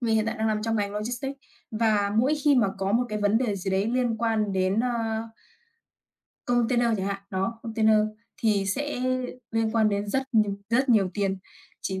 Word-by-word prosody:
Mình 230 Hz, -2 st, +1 dB
hiện 220 Hz, 0 st, +1 dB
tại 225 Hz, -, -2 dB
đang 220 Hz, -, 0 dB
nằm 215 Hz, -1 st, 0 dB
trong 225 Hz, 0 st, 0 dB
ngành 200 Hz, -1 st, -1 dB
logistics. 240 Hz, +6 st, -3 dB, 0.3 s
Và 215 Hz, -2 st, +1 dB
mỗi 270 Hz, +6 st, +3 dB
khi 295 Hz, -1 st, +5 dB
mà 225 Hz, -5 st, +4 dB
có 195 Hz, +1 st, -1 dB
một 240 Hz, +2 st, +3 dB
cái 215 Hz, -1 st, -3 dB
vấn 205 Hz, +2 st, +3 dB
đề 225 Hz, -5 st, -1 dB
gì 190 Hz, +1 st, -3 dB
đấy 190 Hz, +2 st, +1 dB
liên 245 Hz, -2 st, +1 dB
quan 220 Hz, -3 st, 0 dB
đến, 190 Hz, +2 st, +1 dB
ơ 230 Hz, -2 st, -1 dB, 1.2 s
container 240 Hz, 0 st, +2 dB
chẳng 195 Hz, -1 st, -2 dB
hạn, 200 Hz, 0 st, -3 dB
đó, 195 Hz, +4 st, -2 dB
container 220 Hz, -1 st, +3 dB, 0.4 s
thì 205 Hz, -3 st, +2 dB
sẽ 280 Hz, +6 st, -2 dB, 0.5 s
liên 225 Hz, -1 st, 0 dB
quan 220 Hz, -2 st, +4 dB
đến 205 Hz, 0 st, -2 dB
rất 265 Hz, +6 st, +1 dB
nh 215 Hz, -2 st, +4 dB, 0.2 s
rất 260 Hz, +4 st, +2 dB
nhiều 205 Hz, -6 st, +4 dB
tiền. 195 Hz, -2 st, -1 dB, 0.4 s
Chỉ 190 Hz, -1 st, -3 dB
220 Hz, 195 wpm, -26 LUFS, 200-235 Hz, 1.2 s, khi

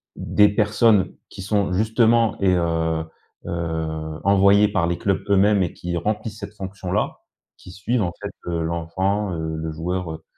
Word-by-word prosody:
des 105 Hz, -1 st, +3 dB
personnes 105 Hz, -1 st, +3 dB, 0.2 s
qui 95 Hz, -, -9 dB
sont 100 Hz, -2 st, 0 dB
justement 110 Hz, +2 st, +2 dB
et 95 Hz, -2 st, +3 dB
heu, 80 Hz, -2 st, 0 dB, 0.4 s
heu, 80 Hz, -2 st, -3 dB
envoyées 100 Hz, +1 st, +5 dB
par 95 Hz, -4 st, 0 dB
les 85 Hz, -, -1 dB
clubs 95 Hz, -2 st, -1 dB
eux-mêmes 100 Hz, 0 st, +4 dB
et 85 Hz, -, -3 dB
qui 85 Hz, 0 st, -5 dB
remplissent 105 Hz, +3 st, -3 dB
cette 105 Hz, -, -8 dB
fonction-là, 95 Hz, -2 st, -3 dB, 0.4 s
qui 90 Hz, -, -13 dB
suivent 105 Hz, +6 st, -1 dB
en 85 Hz, -, -1 dB
fait, -, -, -5 dB, 0.2 s
heu, 85 Hz, -1 st, -1 dB
l'enfant, 90 Hz, +4 st, -1 dB
heu, 80 Hz, -1 st, -3 dB
le 80 Hz, 0 st, -4 dB
joueur, 85 Hz, +1 st, -3 dB
heu, 80 Hz, -, -9 dB
95 Hz, 160 wpm, -22 LUFS, 85-105 Hz, 0.4 s, envoyées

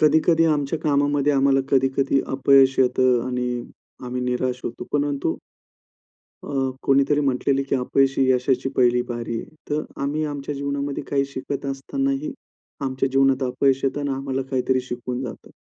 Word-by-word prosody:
कधी-कधी 160 Hz, +2 st, +4 dB
आमच्या 145 Hz, +2 st, -1 dB
कामामध्ये 145 Hz, -1 st, +1 dB
आम्हाला 135 Hz, 0 st, +3 dB
कधी-कधी 135 Hz, +1 st, +2 dB
अपयश 135 Hz, 0 st, +5 dB
येतं 130 Hz, -1 st, +3 dB
आणि 125 Hz, -1 st, -2 dB, 0.4 s
आम्ही 125 Hz, 0 st, -3 dB
निराश 125 Hz, 0 st, -1 dB
होतो. 120 Hz, +1 st, -5 dB
परंतु 145 Hz, -, 0 dB, 1.1 s
अ, -, -, -7 dB, 0.3 s
कोणीतरी 140 Hz, +2 st, +3 dB
म्हटलेलंय 135 Hz, 0 st, +1 dB
की -, -, +2 dB
अपयशी 135 Hz, +1 st, +2 dB
यशाची 130 Hz, +1 st, +1 dB
पहिली 125 Hz, -1 st, +4 dB
पायरी 120 Hz, -1 st, -4 dB
आहे. -, -, -14 dB
तर 150 Hz, +1 st, 0 dB, 0.2 s
आम्ही 145 Hz, +3 st, -1 dB
आमच्या 145 Hz, -1 st, -4 dB
जीवनामध्ये 140 Hz, 0 st, -3 dB
काही 140 Hz, -1 st, +1 dB
शिकत 140 Hz, +2 st, -4 dB
असतानाही 275 Hz, -, -2 dB, 0.5 s
आमच्या 135 Hz, 0 st, -1 dB
जीवनात 135 Hz, 0 st, +3 dB
अपयश 130 Hz, +1 st, +1 dB
येतं 135 Hz, +1 st, 0 dB
आणि 145 Hz, -1 st, -2 dB
आम्हाला 135 Hz, 0 st, -2 dB
काहीतरी 130 Hz, 0 st, +1 dB
शिकवून 125 Hz, 0 st, -5 dB
जातं. 125 Hz, -4 st, -8 dB
135 Hz, 140 wpm, -23 LUFS, 130-140 Hz, 1.1 s, अपयश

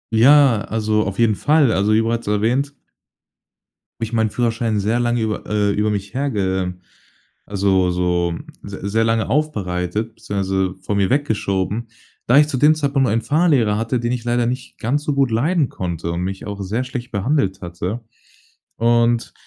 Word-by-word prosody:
Ja, 130 Hz, -1 st, +6 dB
also 110 Hz, -1 st, 0 dB
auf 100 Hz, -, -4 dB
jeden 115 Hz, -2 st, +3 dB
Fall. 145 Hz, +1 st, +3 dB
Also, 100 Hz, +2 st, +1 dB
wie 110 Hz, -, +4 dB
bereits 115 Hz, 0 st, -2 dB
erwähnt 120 Hz, +7 st, 0 dB, 1.3 s
habe 115 Hz, -, 0 dB
ich 110 Hz, -, -9 dB
meinen 110 Hz, -2 st, +1 dB
Führerschein 115 Hz, -3 st, 0 dB
sehr 110 Hz, +4 st, 0 dB
lange 120 Hz, -1 st, 0 dB
über 110 Hz, -1 st, -2 dB
äh, 105 Hz, -1 st, +1 dB
über 105 Hz, +1 st, 0 dB
mich 100 Hz, -1 st, -4 dB
herge 95 Hz, -9 st, -1 dB, 0.7 s
also, 95 Hz, -2 st, +1 dB
so 90 Hz, -1 st, 0 dB, 0.3 s
se 100 Hz, 0 st, -6 dB
sehr 110 Hz, +2 st, +2 dB
lange 115 Hz, 0 st, 0 dB
aufbereitet, 105 Hz, -, -2 dB
beziehungsweise 95 Hz, -3 st, -2 dB
vor 105 Hz, -, -1 dB
mir 100 Hz, -1 st, +2 dB
weggeschoben, 110 Hz, -5 st, -1 dB, 0.4 s
da 125 Hz, +4 st, +5 dB
ich 150 Hz, 0 st, +6 dB
zu 140 Hz, -, -3 dB
dem 150 Hz, +4 st, +5 dB
Zeitpunkt 140 Hz, -4 st, +1 dB
einen 115 Hz, +2 st, +1 dB
Fahrlehrer 145 Hz, -10 st, +2 dB
hatte, 115 Hz, +3 st, -1 dB
den 120 Hz, +1 st, -1 dB
ich 125 Hz, -2 st, -3 dB
leider 120 Hz, 0 st, +1 dB
nicht 125 Hz, +1 st, -5 dB
ganz 135 Hz, +6 st, -1 dB
so 150 Hz, -, -1 dB
gut 135 Hz, -2 st, +2 dB
leiden 145 Hz, +5 st, +1 dB
konnte 85 Hz, -2 st, -4 dB
und 85 Hz, -, -3 dB
mich 95 Hz, +2 st, -4 dB
auch 100 Hz, -1 st, -5 dB
sehr 110 Hz, +7 st, -2 dB
schlecht 125 Hz, -1 st, -6 dB
behandelt 100 Hz, -3 st, 0 dB
hatte. 90 Hz, +6 st, -4 dB, 0.8 s
Und, 120 Hz, 0 st, +2 dB
110 Hz, 170 wpm, -20 LUFS, 100-125 Hz, 1.3 s, Ja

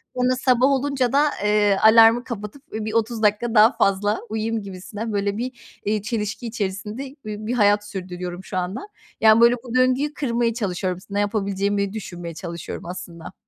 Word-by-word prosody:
sonra 250 Hz, 0 st, +2 dB
sabah 255 Hz, 0 st, +3 dB
olunca 275 Hz, -2 st, +1 dB
da, 295 Hz, +2 st, +4 dB
eee, 210 Hz, -1 st, +3 dB
alarmı 225 Hz, +2 st, +7 dB
kapatıp, 235 Hz, +2 st, -7 dB
ııı, 215 Hz, 0 st, -3 dB
bir 215 Hz, -, -4 dB
30 230 Hz, 0 st, 0 dB
dakika 210 Hz, +3 st, +2 dB
daha 220 Hz, +2 st, +7 dB
fazla 205 Hz, +2 st, +1 dB
uyuyayım 220 Hz, +1 st, -2 dB
gibisinden 205 Hz, +3 st, -6 dB
böyle 200 Hz, 0 st, -1 dB
bir, 240 Hz, -1 st, -7 dB
iii, 210 Hz, 0 st, 0 dB
çelişki 215 Hz, +1 st, -3 dB
içerisinde 210 Hz, +1 st, -4 dB, 0.2 s
bir 215 Hz, 0 st, -6 dB
bir 240 Hz, -, -1 dB
hayat 205 Hz, -3 st, +3 dB
sürdürüyorum 180 Hz, -1 st, -6 dB
şu 185 Hz, -, -5 dB
anda. 185 Hz, -, -3 dB, 0.3 s
Yani, 220 Hz, +1 st, +6 dB
böyle 235 Hz, +1 st, +6 dB
bu 245 Hz, -1 st, -6 dB
döngüyü 255 Hz, +4 st, +2 dB
kırmaya 235 Hz, -5 st, 0 dB
çalışıyorum. 185 Hz, -5 st, -2 dB
S 185 Hz, -, -19 dB
ne 200 Hz, -, 0 dB
yapabileceğimi 200 Hz, -1 st, -1 dB
düşünmeye 175 Hz, -5 st, -7 dB
çalışıyorum 170 Hz, 0 st, -7 dB
aslında. 170 Hz, -2 st, -8 dB
215 Hz, 170 wpm, -22 LUFS, 200-235 Hz, 0.3 s, alarmı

